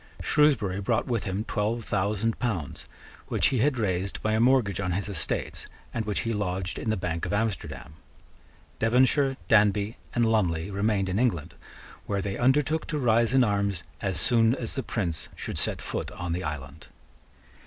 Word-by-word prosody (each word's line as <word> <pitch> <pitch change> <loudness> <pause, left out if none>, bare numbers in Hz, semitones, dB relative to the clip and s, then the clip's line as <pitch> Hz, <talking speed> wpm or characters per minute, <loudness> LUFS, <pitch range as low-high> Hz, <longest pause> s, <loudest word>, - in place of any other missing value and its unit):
Shrewsbury 120 -11 +2
brought 110 +3 +1
with 120 -4 -1
him 95 +2 -2
twelve 110 +1 -2
thousand 105 +3 0
pounds, 95 - -3 0.4
which - - +3
he 130 - 0
had 135 +2 +2
raised 95 -3 -1
by 110 - +1
a 110 - +2
mortgage 115 -6 +3
on 90 -3 -1
his 100 +3 -2
estates, 100 -6 -2 0.3
and 115 -2 -2
which 105 -1 0
he 115 - -1
lodged 95 -3 -2
in - - -3
the 110 - +1
bank 85 -2 -3
of - - -3
Amsterdam. 90 -10 -2 0.9
Devonshire, 130 +4 +3
Danby, 105 0 +3 0.2
and 120 -1 +3
Lumley 95 -5 +1
remained 100 0 +1
in 95 +3 -1
England, 90 -10 0 0.5
where 100 - 0
they 100 -1 -2
undertook 145 +5 +2
to 150 - -2
rise 115 -3 +3
in 130 -1 +5
arms 100 -4 0 0.2
as 95 -2 0
soon 115 0 +4
as 120 -4 -4
the 135 - -1
Prince 90 -9 -3
should - - -4
set - - 0
foot - - -3
on 85 -1 -4
the 90 - -2
island. 75 0 -6
105 Hz, 175 wpm, -27 LUFS, 95-120 Hz, 0.9 s, in